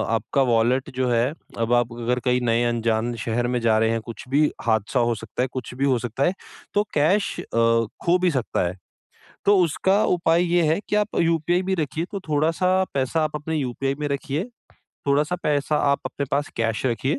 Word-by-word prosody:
आपका 115 Hz, +5 st, 0 dB
वॉलेट 120 Hz, +4 st, +2 dB
जो 130 Hz, -1 st, 0 dB
है, 120 Hz, +4 st, +2 dB, 0.2 s
अब 115 Hz, +1 st, 0 dB
आप 120 Hz, -1 st, +2 dB
अगर 120 Hz, +1 st, -1 dB
कहीं 125 Hz, 0 st, +2 dB
नए 115 Hz, 0 st, +2 dB
अनजान 115 Hz, 0 st, 0 dB
शहर 120 Hz, +1 st, 0 dB
में 125 Hz, -, +1 dB
जा 110 Hz, -1 st, +3 dB
रहे 110 Hz, 0 st, +2 dB
हैं, 115 Hz, 0 st, -1 dB
कुछ 115 Hz, -, -8 dB
भी 150 Hz, +3 st, +3 dB
हादसा 110 Hz, +2 st, +1 dB
हो 120 Hz, -, 0 dB
सकता 115 Hz, +2 st, -5 dB
है, -, -, 0 dB
कुछ 130 Hz, -2 st, -5 dB
भी 135 Hz, +2 st, 0 dB
हो 130 Hz, -3 st, +2 dB
सकता 120 Hz, +4 st, -2 dB
है, 175 Hz, -, +2 dB, 0.4 s
तो 205 Hz, -, +3 dB
कैश 175 Hz, +8 st, +1 dB
अ, -, -, -11 dB, 0.6 s
खो 175 Hz, +1 st, +4 dB
भी 180 Hz, -, +4 dB
सकता 130 Hz, -, -1 dB
है। 90 Hz, +2 st, -6 dB, 0.7 s
तो 205 Hz, 0 st, +5 dB
उसका 190 Hz, +5 st, +2 dB
उपाय 170 Hz, -1 st, +2 dB
ये 175 Hz, 0 st, +4 dB
है 160 Hz, +4 st, +2 dB
कि -, -, +1 dB
आप 210 Hz, 0 st, 0 dB
यूपीआई 165 Hz, +2 st, +1 dB
भी 190 Hz, +1 st, -1 dB
रखिए, 160 Hz, 0 st, -2 dB
तो 200 Hz, -, -3 dB
थोड़ा-सा 165 Hz, +5 st, +2 dB
पैसा 140 Hz, +4 st, 0 dB
आप 155 Hz, 0 st, -2 dB
अपने 155 Hz, +2 st, -3 dB
यूपीआई 135 Hz, -1 st, -2 dB
में 150 Hz, -, -1 dB
रखिए, 140 Hz, +2 st, -2 dB, 0.6 s
थोड़ा-सा 150 Hz, +5 st, +2 dB
पैसा 150 Hz, 0 st, +1 dB
आप 140 Hz, -, +1 dB
अपने 140 Hz, +2 st, -3 dB
पास 145 Hz, +1 st, 0 dB
कैश 115 Hz, 0 st, -1 dB
रखिए। 130 Hz, +5 st, 0 dB
135 Hz, 205 wpm, -23 LUFS, 120-160 Hz, 0.7 s, तो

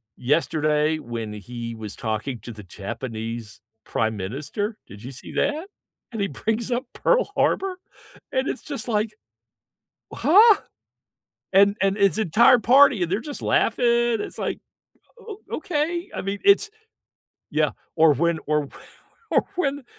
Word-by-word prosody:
yesterday 150 Hz, +2 st, +1 dB
when 115 Hz, -5 st, -5 dB
he 115 Hz, +3 st, -7 dB
was 110 Hz, -2 st, -8 dB
talking 110 Hz, +2 st, -3 dB
to 120 Hz, -, -8 dB
the 105 Hz, -2 st, -10 dB
Japanese 110 Hz, +2 st, -6 dB, 0.2 s
Prime 110 Hz, -1 st, -1 dB
Minister, 145 Hz, -, -4 dB
did 100 Hz, +3 st, -12 dB
you 130 Hz, -, -7 dB
see 125 Hz, -, -11 dB
that? 320 Hz, +5 st, -1 dB, 0.4 s
And 225 Hz, -3 st, -4 dB
he 200 Hz, -, +1 dB
brings 225 Hz, +4 st, -2 dB
up 245 Hz, +3 st, -1 dB
Pearl -, -, +2 dB
Harbor, 385 Hz, -1 st, +1 dB, 0.6 s
and 260 Hz, +1 st, 0 dB
it's -, -, -3 dB
just, 285 Hz, -4 st, -6 dB
like, 215 Hz, -1 st, 0 dB, 1.0 s
huh? 420 Hz, +5 st, +6 dB, 1.0 s
And 200 Hz, +1 st, +5 dB
and 195 Hz, +1 st, +2 dB
his 200 Hz, 0 st, +3 dB
entire 235 Hz, +5 st, +5 dB
party, 255 Hz, -4 st, +5 dB
and 170 Hz, -, -3 dB
they're 195 Hz, -, +1 dB
just 290 Hz, +4 st, -7 dB
laughing, 245 Hz, -, +1 dB, 0.4 s
it's, -, -, -7 dB
like, -, -, -2 dB, 0.6 s
o 430 Hz, -2 st, -9 dB, 0.2 s
okay, 340 Hz, 0 st, -2 dB
I -, -, -3 dB
mean, 195 Hz, +1 st, -3 dB
it's, 405 Hz, +1 st, +5 dB, 0.8 s
yeah, -, -, +2 dB, 0.3 s
or 160 Hz, -1 st, +6 dB
when 170 Hz, +3 st, +1 dB
or 150 Hz, -2 st, 0 dB, 0.6 s
or -, -, +3 dB
when 285 Hz, -5 st, -1 dB
190 Hz, 140 wpm, -23 LUFS, -, 1.0 s, huh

